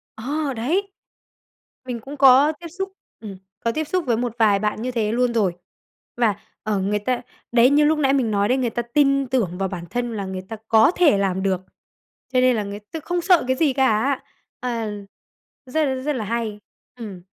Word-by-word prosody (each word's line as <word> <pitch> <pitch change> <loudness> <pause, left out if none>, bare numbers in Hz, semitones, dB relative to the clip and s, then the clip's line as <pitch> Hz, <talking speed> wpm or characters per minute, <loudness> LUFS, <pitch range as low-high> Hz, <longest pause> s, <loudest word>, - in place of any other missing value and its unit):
Ờ, 280 +5 -2
đấy. 360 - -1 0.9
Mình 245 -2 -4
cũng 275 +6 -9
có 270 +2 +7
tiếp 345 - -8
xúc, 385 +4 -5 0.3
ừm, 205 -4 -8 0.2
có 230 - 0
tiếp 315 +6 -2
xúc 365 -4 -1
với 235 -2 +2
một 240 -1 -2
vài 210 -3 +4
bạn 215 +1 -2
như 255 +2 -2
thế 220 -3 0
luôn 245 +1 +1
rồi 200 -6 +1 0.6
và, 230 -4 +2 0.3
ờ, 215 -2 0
người 205 +2 0
ta 245 +4 -1 0.3
đấy, 240 +1 +6
như 295 +1 +4
lúc 305 +1 +2
nãy 275 -2 +3
mình 255 -5 +1
nói 200 0 +2
đấy, 255 - +2
người 250 -3 0
ta 240 +1 -2
tin 275 +2 +2
tưởng 220 -9 -1
vào 195 0 -1
bản 175 -3 -6
thân 240 -1 -2
là 200 - -3
người 190 -1 -5
ta 225 - -4
có 220 +6 +5
thể 315 - +4
làm 190 -1 0
được 190 -2 0 0.7
cho 255 - +4
nên 255 -1 +4
là 215 - -1
người 200 0 -6
ta 325 - -4
không 350 +3 -2
sợ 355 -1 +4
cái 260 - +2
gì 295 -3 +2
cả, 265 0 +2 0.4
à, 230 -3 -3 0.7
rất, 270 0 0
rất 300 +1 0
là 220 - -3
hay. 225 -1 -3 0.4
Ừm. 210 -7 -8
240 Hz, 210 wpm, -22 LUFS, 210-275 Hz, 0.9 s, có